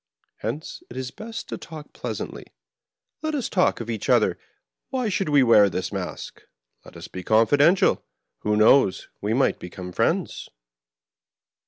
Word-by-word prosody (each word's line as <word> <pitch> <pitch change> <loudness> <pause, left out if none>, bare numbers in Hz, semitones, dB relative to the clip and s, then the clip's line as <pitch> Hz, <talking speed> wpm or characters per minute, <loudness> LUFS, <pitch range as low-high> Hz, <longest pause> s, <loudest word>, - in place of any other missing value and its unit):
Hence 155 +3 -5
it 120 - -9
is 130 -1 -4
best 225 +1 -7
to - - -5
talk 155 -2 -10
pleasantly. 110 -4 -6 0.7
Let 310 0 -2
us 270 - -2
talk 180 - +2
of 115 - -6
each 115 -3 -4
other: - - +3 0.5
why 255 -4 -1
should 190 -3 -1
we 145 -2 +5
wear 105 -4 +6
this 90 - -3
mask. - - -6 0.4
Let - - -13
us - - -9
be 90 - -8
confi 115 +7 +3
dential. 180 +6 +4 0.4
Who 105 0 0
knows, 110 -1 +4
we 105 +3 0
might 135 - +2
become 90 0 -8
friends - - -1
130 Hz, 155 wpm, -24 LUFS, 105-175 Hz, 0.7 s, wear